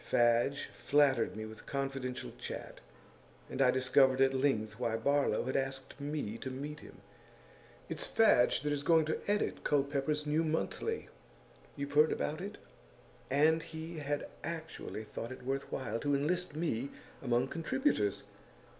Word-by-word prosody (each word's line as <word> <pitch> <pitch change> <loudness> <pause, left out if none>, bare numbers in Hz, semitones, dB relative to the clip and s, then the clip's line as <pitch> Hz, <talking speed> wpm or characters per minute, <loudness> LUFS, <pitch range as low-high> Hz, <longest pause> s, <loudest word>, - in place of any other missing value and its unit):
Fadge 120 +4 +2
flattered 140 -7 +3
me 110 0 -5
with 110 0 -11
confidential 135 -2 -3
chat, - - -6 0.7
and 135 - -1
I 130 - +6
discovered 130 +1 +4
at 135 0 +5
length 115 -5 0
why 115 -2 0
Barlow 140 -1 +2
had 130 +2 -3
asked 135 0 -2
me 140 -7 -3
to 130 - -4
meet 145 +3 -5
him; - - -14 0.9
it's - - -2
Fadge 220 - +4
that 145 +1 0
is 145 - -1
going 160 +1 +4
to 155 - -1
edit 205 +1 0
Culpepper's 145 +1 +1
new 150 +2 +2
monthly 165 - -2 0.7
you've 140 0 -4
heard 150 +2 +6
about 155 +3 -2
it? 200 +2 -6 0.7
and 155 +4 +4
he 160 +1 -7
had 145 0 -2 0.2
actually 160 -8 -5
thought 115 +2 -6
it 130 - -9
worth 135 +1 -2
while 115 -4 -2
to 145 +3 +1
enlist 165 +3 0
me 140 -5 -1 0.3
among 125 0 +1
contributors! 170 - 0
140 Hz, 145 wpm, -33 LUFS, 130-155 Hz, 0.9 s, I